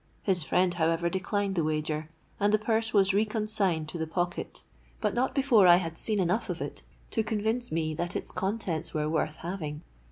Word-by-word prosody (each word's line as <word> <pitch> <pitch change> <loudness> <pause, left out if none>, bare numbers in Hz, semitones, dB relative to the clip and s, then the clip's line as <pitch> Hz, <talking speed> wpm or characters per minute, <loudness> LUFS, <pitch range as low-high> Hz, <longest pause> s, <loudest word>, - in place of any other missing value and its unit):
His 185 -4 +1
friend, 180 +3 +2
however, 165 +1 +1
declined 195 +1 -1
the 170 -4 +1
wager; 155 0 -2 0.3
and 205 +1 +3
the 215 - +5
purse 220 +1 0
was 195 -2 +4
re 205 +2 +4
consigned 210 -7 0
to 170 - -6
the 160 - -2
pocket, 175 +2 -3 0.4
but 210 -2 0
not 250 +3 0
before 255 -9 +5
I 175 - +9
had 165 -2 -2
seen 210 +4 0
enough 185 +5 0
of - - -3
it - - -5 0.3
to 225 - +1
convince 220 +3 -1
me 155 -1 -1
that 175 +3 -3
its - - -3
contents 190 -6 -2
were 150 0 0
worth 155 0 0
having. 165 -4 -5
185 Hz, 195 wpm, -29 LUFS, 160-215 Hz, 0.4 s, I